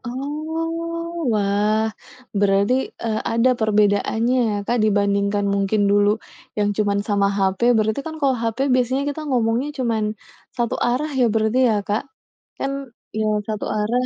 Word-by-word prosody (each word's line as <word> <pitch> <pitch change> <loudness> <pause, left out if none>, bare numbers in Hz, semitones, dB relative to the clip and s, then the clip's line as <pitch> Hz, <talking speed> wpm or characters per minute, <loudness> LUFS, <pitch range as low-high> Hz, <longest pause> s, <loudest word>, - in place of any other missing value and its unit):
Oh, 325 +4 -4
wah. 205 +1 +1 0.6
Berarti, 200 +3 +3 0.3
eee, 220 -1 -1
ada 230 +3 +3
perbedaannya 215 +3 +2
ya, - - -1
Kak, 240 0 +1
dibandingkan 200 -1 +1
mungkin 200 +1 +1
dulu 205 0 +4 0.5
yang 205 0 +2
cuman 205 -1 +1
sama 200 -1 +2
HP, 190 0 0 0.2
berarti 220 +3 +1
kan 315 0 -5
kalau 275 -2 +3
HP 225 0 -2 0.2
biasanya 255 +2 +1
kita 300 - -6
ngomongnya 240 +1 +1
cuman 230 -4 0 0.5
satu 240 -1 0
arah 260 +6 0
ya. - - +5
berarti 220 +2 +1
ya, 220 - +2
Kak, 210 +2 0 0.6
kan, 275 - -1 0.4
iya, 220 0 0 0.2
satu 215 -1 -3
arah. 235 +4 0
220 Hz, 140 wpm, -21 LUFS, 205-255 Hz, 0.6 s, ya